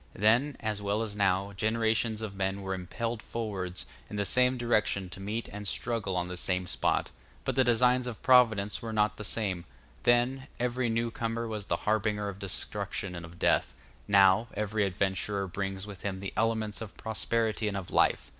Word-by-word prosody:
Then, 120 Hz, +8 st, +3 dB
as 110 Hz, -2 st, -2 dB
well 100 Hz, +2 st, 0 dB
as 105 Hz, -2 st, -5 dB
now, 100 Hz, 0 st, +1 dB
generations 110 Hz, +1 st, +1 dB
of 105 Hz, -3 st, -4 dB
men 95 Hz, 0 st, -2 dB
were 95 Hz, 0 st, -2 dB
impelled 110 Hz, +5 st, -3 dB
forwards 100 Hz, -7 st, -4 dB, 0.2 s
in -, -, -6 dB
the 100 Hz, 0 st, 0 dB
same 125 Hz, +5 st, +4 dB
direction 105 Hz, -6 st, +1 dB
to 90 Hz, -, -8 dB
meet 105 Hz, +4 st, -3 dB
and 105 Hz, 0 st, -6 dB
struggle 115 Hz, -6 st, -1 dB
on 90 Hz, 0 st, 0 dB
the 90 Hz, 0 st, -5 dB
same 90 Hz, +1 st, 0 dB
spot; 90 Hz, -, 0 dB, 0.3 s
but -, -, 0 dB
the 130 Hz, -, +5 dB
designs 125 Hz, +1 st, +3 dB
of 120 Hz, -3 st, -6 dB
Providence 110 Hz, -7 st, +4 dB
were 115 Hz, -, -4 dB
not 105 Hz, 0 st, +2 dB
the 105 Hz, -, -6 dB
same; 100 Hz, -5 st, 0 dB, 0.4 s
then, 125 Hz, +3 st, +2 dB
every 125 Hz, 0 st, 0 dB
newcomer 115 Hz, 0 st, -1 dB
was 105 Hz, -3 st, -5 dB
the -, -, +1 dB
harbinger 105 Hz, -1 st, +1 dB
of 100 Hz, 0 st, -8 dB
destruction 100 Hz, -1 st, -3 dB
and 85 Hz, -1 st, -6 dB
of 85 Hz, +1 st, -14 dB
death; -, -, +2 dB, 0.3 s
now, 100 Hz, +2 st, +5 dB
every 105 Hz, 0 st, 0 dB
adventurer 100 Hz, +1 st, -1 dB
brings 95 Hz, +1 st, -4 dB
with 100 Hz, -3 st, -9 dB
him 95 Hz, -2 st, -3 dB
the 100 Hz, 0 st, -5 dB
elements 110 Hz, -1 st, 0 dB
of 110 Hz, -3 st, -8 dB
prosperity 110 Hz, 0 st, 0 dB
and 100 Hz, -1 st, -1 dB
of 95 Hz, -2 st, -6 dB
life. -, -, +3 dB
105 Hz, 185 wpm, -30 LUFS, 95-115 Hz, 0.4 s, the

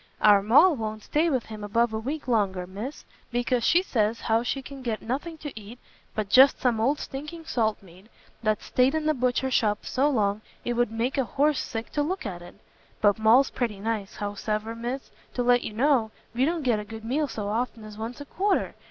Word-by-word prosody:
"Our 205 Hz, -1 st, +6 dB
Moll 290 Hz, -, +6 dB
won't 215 Hz, -3 st, -5 dB
stay 320 Hz, +3 st, +1 dB
with 260 Hz, -6 st, 0 dB
him 215 Hz, -1 st, -8 dB
above 230 Hz, +2 st, +1 dB
a 220 Hz, -, -1 dB
week 280 Hz, +7 st, -4 dB
longer, 195 Hz, -6 st, +1 dB
Miss, 210 Hz, +10 st, -7 dB, 0.3 s
because 245 Hz, 0 st, 0 dB
she 345 Hz, +8 st, +4 dB
says 225 Hz, -, 0 dB
how 225 Hz, +1 st, +2 dB
she 265 Hz, +3 st, -2 dB
can 275 Hz, 0 st, -9 dB
get 230 Hz, -4 st, -2 dB
nothing 285 Hz, +8 st, -3 dB
to 295 Hz, -3 st, -7 dB
eat, 220 Hz, +2 st, -10 dB, 0.4 s
but 215 Hz, -2 st, -1 dB
just 260 Hz, +6 st, +6 dB
some 240 Hz, -3 st, +1 dB
old 275 Hz, +6 st, +2 dB
stinking 300 Hz, +5 st, -7 dB
salt 220 Hz, -8 st, 0 dB
meat, 185 Hz, +2 st, -17 dB, 0.3 s
that's 215 Hz, -2 st, 0 dB
stayed 255 Hz, +4 st, +2 dB
in 315 Hz, -1 st, -1 dB
the 310 Hz, -, +3 dB
butcher's 255 Hz, 0 st, 0 dB
shop 210 Hz, -3 st, +1 dB
so 275 Hz, +3 st, +2 dB
long, 210 Hz, -5 st, +1 dB, 0.2 s
it 240 Hz, -, 0 dB
would 240 Hz, -1 st, +1 dB
make 240 Hz, +5 st, -1 dB
a -, -, +3 dB
horse 290 Hz, +4 st, +1 dB
sick 225 Hz, -1 st, -5 dB
to 295 Hz, -, 0 dB
look 360 Hz, +2 st, -2 dB
at 180 Hz, -4 st, -5 dB
it. 175 Hz, +1 st, -12 dB, 0.4 s
But 205 Hz, 0 st, +3 dB
Moll's 230 Hz, +5 st, +5 dB
pretty 225 Hz, -5 st, -2 dB
nice; 215 Hz, -1 st, -3 dB
howsever, 210 Hz, +2 st, -3 dB
Miss, 240 Hz, +4 st, -5 dB, 0.2 s
to 245 Hz, -, 0 dB
let 245 Hz, 0 st, +4 dB
you 215 Hz, -, -5 dB
know, 245 Hz, -1 st, +2 dB, 0.2 s
we 250 Hz, +3 st, +2 dB
don't 330 Hz, 0 st, -1 dB
get 240 Hz, -5 st, +2 dB
a -, -, -4 dB
good 220 Hz, +1 st, -9 dB
meal 290 Hz, +6 st, 0 dB
so 210 Hz, -6 st, -4 dB
often 230 Hz, +1 st, -2 dB
as 215 Hz, -1 st, -10 dB
once 225 Hz, +4 st, -6 dB
a 285 Hz, -, -7 dB
quarter! 390 Hz, +6 st, 0 dB
235 Hz, 215 wpm, -26 LUFS, 215-270 Hz, 0.4 s, Our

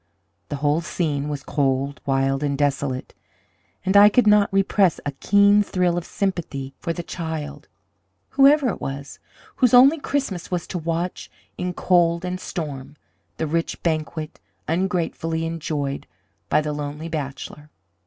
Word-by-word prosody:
The -, -, -3 dB
whole 145 Hz, +3 st, +1 dB
scene 150 Hz, -4 st, -2 dB
was 145 Hz, -2 st, -4 dB
cold, 140 Hz, 0 st, -1 dB
wild, 135 Hz, 0 st, +1 dB
and 140 Hz, -1 st, -1 dB
desolate, 140 Hz, -2 st, -1 dB, 0.7 s
and 190 Hz, +1 st, +1 dB
I 205 Hz, +1 st, +9 dB
could 245 Hz, +3 st, +3 dB
not 210 Hz, -1 st, +5 dB
repress 195 Hz, -2 st, +2 dB
a 145 Hz, -, -1 dB
keen 200 Hz, +8 st, +4 dB
thrill 180 Hz, -3 st, 0 dB
of 175 Hz, -1 st, -3 dB
sympathy 160 Hz, -9 st, -3 dB
for 170 Hz, -, -3 dB
the 175 Hz, +1 st, -4 dB
child, 160 Hz, -3 st, -6 dB, 0.6 s
whoever 280 Hz, -1 st, +5 dB
it -, -, -5 dB
was, 140 Hz, +1 st, -6 dB, 0.4 s
whose 250 Hz, -2 st, +4 dB
only 275 Hz, +6 st, +7 dB
Christmas 265 Hz, -12 st, -2 dB
was 180 Hz, -2 st, -2 dB
to 180 Hz, -, -4 dB
watch, 170 Hz, +2 st, -3 dB, 0.3 s
in 180 Hz, 0 st, -3 dB
cold 170 Hz, -1 st, +2 dB
and 180 Hz, 0 st, -3 dB
storm, 145 Hz, -6 st, -6 dB, 0.4 s
the 160 Hz, -, -1 dB
rich 165 Hz, +2 st, -2 dB
banquet 155 Hz, -1 st, -2 dB, 0.3 s
ungratefully 165 Hz, -2 st, -1 dB
enjoyed 150 Hz, -4 st, -3 dB, 0.4 s
by -, -, +3 dB
the 150 Hz, 0 st, -3 dB
lonely 150 Hz, +2 st, -5 dB
bachelor. 150 Hz, -1 st, -6 dB
165 Hz, 145 wpm, -23 LUFS, 145-185 Hz, 0.7 s, I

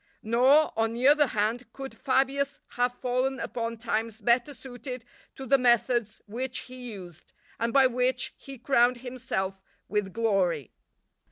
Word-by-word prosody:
Nor, 260 Hz, +7 st, +4 dB
on 225 Hz, 0 st, 0 dB
the 250 Hz, +3 st, +2 dB
other 295 Hz, 0 st, +6 dB
hand, 225 Hz, +2 st, -1 dB
could 270 Hz, 0 st, -8 dB
Fabius 275 Hz, +1 st, 0 dB
have 245 Hz, 0 st, 0 dB
fallen 255 Hz, +1 st, -1 dB
upon 230 Hz, -1 st, -3 dB
times 225 Hz, -1 st, -2 dB
better 235 Hz, +5 st, +2 dB
suited 250 Hz, -2 st, -8 dB, 0.3 s
to 270 Hz, -, -7 dB
the 275 Hz, +2 st, +4 dB
methods 240 Hz, -2 st, +2 dB
which 250 Hz, +4 st, -4 dB
he 250 Hz, -1 st, -8 dB
used, 175 Hz, -5 st, -11 dB, 0.3 s
and 230 Hz, 0 st, 0 dB
by 270 Hz, +2 st, +5 dB
which 250 Hz, 0 st, 0 dB
he 275 Hz, -1 st, -10 dB
crowned 245 Hz, 0 st, +3 dB
himself 195 Hz, -7 st, -3 dB, 0.3 s
with 205 Hz, -2 st, -1 dB
glory. 185 Hz, -, 0 dB
245 Hz, 145 wpm, -27 LUFS, 225-260 Hz, 0.3 s, other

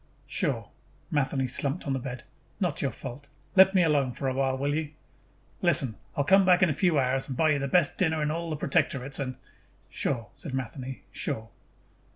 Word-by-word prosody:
"Sure." -, -, -1 dB, 0.4 s
Matheny 135 Hz, -2 st, +1 dB
slumped 140 Hz, +6 st, -1 dB
on 140 Hz, -, -1 dB
the 135 Hz, -, -1 dB
bed. 130 Hz, 0 st, -6 dB, 0.4 s
"Not 175 Hz, -7 st, 0 dB
your 140 Hz, -, +1 dB
fault. 130 Hz, +4 st, -8 dB, 0.3 s
Let 190 Hz, 0 st, +7 dB
me 180 Hz, -, +5 dB
alone 145 Hz, -6 st, +2 dB
for 135 Hz, -, -3 dB
a 130 Hz, -, 0 dB
while, 135 Hz, 0 st, 0 dB
will 140 Hz, +2 st, 0 dB
you?" 155 Hz, 0 st, -2 dB, 0.7 s
"Listen, 140 Hz, -, +2 dB, 0.2 s
I -, -, +3 dB
will -, -, -1 dB
come 195 Hz, +4 st, +6 dB
back 180 Hz, 0 st, +5 dB
in 175 Hz, -, +4 dB
a -, -, 0 dB
few 165 Hz, +1 st, +2 dB
hours 135 Hz, 0 st, +1 dB
and 130 Hz, -3 st, -5 dB
buy 160 Hz, -1 st, +4 dB
you 145 Hz, -, +2 dB
the 140 Hz, -, -1 dB
best 170 Hz, +2 st, +2 dB
dinner 160 Hz, -4 st, +2 dB
in 150 Hz, -, 0 dB
all 170 Hz, +1 st, -3 dB
the 155 Hz, -, -2 dB
Protectorates 135 Hz, -1 st, 0 dB
and 130 Hz, -2 st, -3 dB, 0.3 s
" -, -, -35 dB
"Sure," 115 Hz, -4 st, -1 dB
said 135 Hz, -5 st, -6 dB
Matheny. 130 Hz, +1 st, -5 dB
"Sure." 110 Hz, -6 st, -3 dB
140 Hz, 205 wpm, -28 LUFS, 130-160 Hz, 0.7 s, Let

